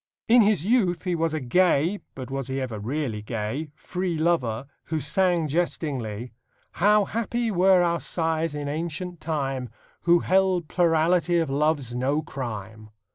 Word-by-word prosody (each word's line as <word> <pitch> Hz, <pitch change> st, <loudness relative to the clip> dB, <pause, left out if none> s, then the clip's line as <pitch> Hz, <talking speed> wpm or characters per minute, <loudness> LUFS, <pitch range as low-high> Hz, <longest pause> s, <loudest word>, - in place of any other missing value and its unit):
In 240 Hz, +1 st, +7 dB
his 205 Hz, -6 st, +3 dB
youth 200 Hz, -6 st, +2 dB
he 180 Hz, -1 st, -1 dB
was 165 Hz, -1 st, 0 dB
a 155 Hz, -, -1 dB
gay 175 Hz, +6 st, +2 dB, 0.2 s
but 130 Hz, 0 st, -7 dB
was 135 Hz, -1 st, -3 dB
he 135 Hz, 0 st, -2 dB
ever 120 Hz, -5 st, -4 dB
really 120 Hz, -1 st, -3 dB
gay? 115 Hz, +8 st, -4 dB
free 180 Hz, 0 st, -3 dB
lover, 140 Hz, -8 st, 0 dB, 0.2 s
who 160 Hz, -1 st, -2 dB
sang 170 Hz, +3 st, +1 dB
jestingly: 135 Hz, -8 st, -2 dB, 0.4 s
How 210 Hz, +3 st, +3 dB
happy 230 Hz, +2 st, -2 dB
were 185 Hz, -1 st, +4 dB
our 170 Hz, -1 st, +1 dB
sires 160 Hz, -2 st, -1 dB
in 145 Hz, -1 st, -4 dB
ancient 170 Hz, +3 st, -4 dB
time, 135 Hz, -6 st, -2 dB, 0.4 s
Who 170 Hz, 0 st, +5 dB
held 185 Hz, -3 st, +2 dB
plurality 170 Hz, 0 st, +2 dB
of 165 Hz, -5 st, 0 dB
loves 145 Hz, -3 st, 0 dB
no 135 Hz, +5 st, 0 dB
crime! 110 Hz, -7 st, -7 dB
160 Hz, 150 wpm, -25 LUFS, 135-180 Hz, 0.4 s, In